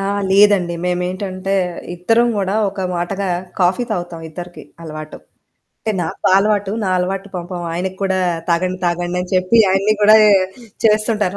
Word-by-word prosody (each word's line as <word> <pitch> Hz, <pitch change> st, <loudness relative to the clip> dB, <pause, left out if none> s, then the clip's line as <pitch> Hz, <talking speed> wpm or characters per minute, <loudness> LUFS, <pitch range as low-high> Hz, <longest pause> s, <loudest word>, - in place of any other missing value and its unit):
ఆ! 195 Hz, -, -2 dB, 0.3 s
లేదండి. 195 Hz, -4 st, +4 dB
మేమేంటంటే, 185 Hz, +2 st, -2 dB, 0.4 s
ఇద్దరం 225 Hz, +7 st, +2 dB
గూడా 195 Hz, 0 st, -1 dB, 0.2 s
ఒక 200 Hz, -, -7 dB, 0.2 s
మాటగా 190 Hz, +3 st, -2 dB, 0.3 s
కాఫీ 180 Hz, +7 st, +2 dB
తాగుతాం, 175 Hz, -4 st, -4 dB
ఇద్దరికీ 175 Hz, +2 st, -9 dB, 0.2 s
అలవాటు. 155 Hz, -1 st, -8 dB, 0.7 s
టే 220 Hz, -, +1 dB
నాకు 160 Hz, -, -6 dB
ఆ -, -, +4 dB
అలవాటు. 205 Hz, -1 st, +1 dB
నా -, -, 0 dB
అలవాటు 195 Hz, +2 st, -3 dB
పాపం 175 Hz, 0 st, -5 dB
ఆయనకి 185 Hz, +2 st, -3 dB
కూడా 190 Hz, -1 st, +1 dB, 0.3 s
తాగండి, 180 Hz, +2 st, 0 dB
తాగండి 175 Hz, +1 st, -1 dB
అని 180 Hz, -, -9 dB
చెప్పి 185 Hz, +5 st, +2 dB
ఆయన్ని 195 Hz, +3 st, +2 dB
గూడాయే 215 Hz, 0 st, +7 dB, 0.5 s
చేస్తుంటాను. 215 Hz, -3 st, +2 dB
185 Hz, 145 wpm, -18 LUFS, 175-205 Hz, 0.7 s, గూడాయే